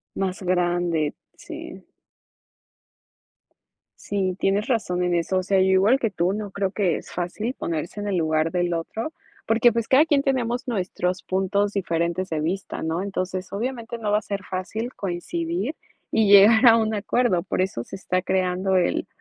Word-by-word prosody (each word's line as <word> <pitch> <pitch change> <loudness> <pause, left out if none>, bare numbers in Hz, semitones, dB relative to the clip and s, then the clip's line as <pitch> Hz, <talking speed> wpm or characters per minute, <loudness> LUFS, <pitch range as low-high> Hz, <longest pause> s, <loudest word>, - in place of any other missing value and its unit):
Más 190 0 -2
grande, 175 -4 0 0.2
sí. - - -9 2.2
Sí, 190 -2 -2
tienes 200 +3 +1
razón 190 -8 0
en 180 - +1
eso, 175 +2 0
o 185 - 0
sea, 195 0 +2
yo 185 - +4
igual 195 +7 +4
que 225 -5 0
tú, 180 0 0
no 205 -1 -5
creo 195 -1 -1
que 190 -4 +1
es - - -11
fácil 195 +8 -3
ponerse 170 - -4
en 205 - -4
el 195 -3 0
lugar 160 0 +1
del 175 -1 0
otro, 220 - -4 0.3
porque, 225 +2 +4
pues, 230 0 -2
cada 275 +4 +5
quien 290 -4 +2
tenemos 250 -2 -1
nuestros 185 -4 -2
puntos 200 +2 0
diferentes 170 -1 -1
de 160 - -1
vista, 175 +6 -3
¿no? 160 +3 -1
Entonces, 185 -1 -4
obviamente, 235 +2 -4
no 215 -2 -2
va 210 - +4
a - - -13
ser 200 -1 -4
fácil 215 +7 -4
coincidir 175 - -3 0.4
y 210 -2 +3
llegar 220 +5 +8
a 230 0 +8
un 220 -1 0
acuerdo, 205 -3 +1
por 190 - -1
eso 185 -11 -2
se 195 - -9
está 185 -1 -1
creando 185 0 0
el 180 - 0
190 Hz, 170 wpm, -24 LUFS, 180-220 Hz, 2.2 s, llegar